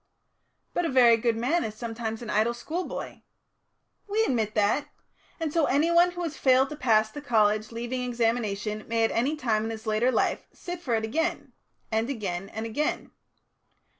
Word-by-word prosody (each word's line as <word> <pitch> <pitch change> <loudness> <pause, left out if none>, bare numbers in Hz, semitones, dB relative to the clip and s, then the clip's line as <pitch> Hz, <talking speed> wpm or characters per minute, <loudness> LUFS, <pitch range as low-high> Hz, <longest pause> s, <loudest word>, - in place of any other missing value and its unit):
"But 350 - 0
a 330 - 0
very 245 -3 +6
good 230 0 0
man 285 +9 +1
is 215 -1 -5
sometimes 225 0 -5
an 220 - -5
idle 220 +3 +2
schoolboy." 325 +9 -5 0.9
"We 425 +2 +1
admit 225 - 0
that. 210 +7 +2 0.5
And 320 -2 -2
so 330 -3 +3
anyone 340 +5 +4
who 350 0 -4
has 320 -3 -3
failed 265 0 +4
to 300 - -6
pass 220 -6 +2
the 290 - -7
college 215 -4 +2
leaving 240 +2 -3
examination 225 -3 -1
may 230 0 +1
at 225 - +2
any 265 +7 +1
time 225 -6 0
in 225 -1 -5
later 220 +4 +2
life - - 0
sit 350 -1 -7
for 245 -8 0
it 220 - -1
again 325 +10 -2 0.4
and 225 +3 0
again 195 -7 -3
and 220 +1 -5
again. 260 +7 -2
235 Hz, 170 wpm, -27 LUFS, 220-290 Hz, 0.9 s, very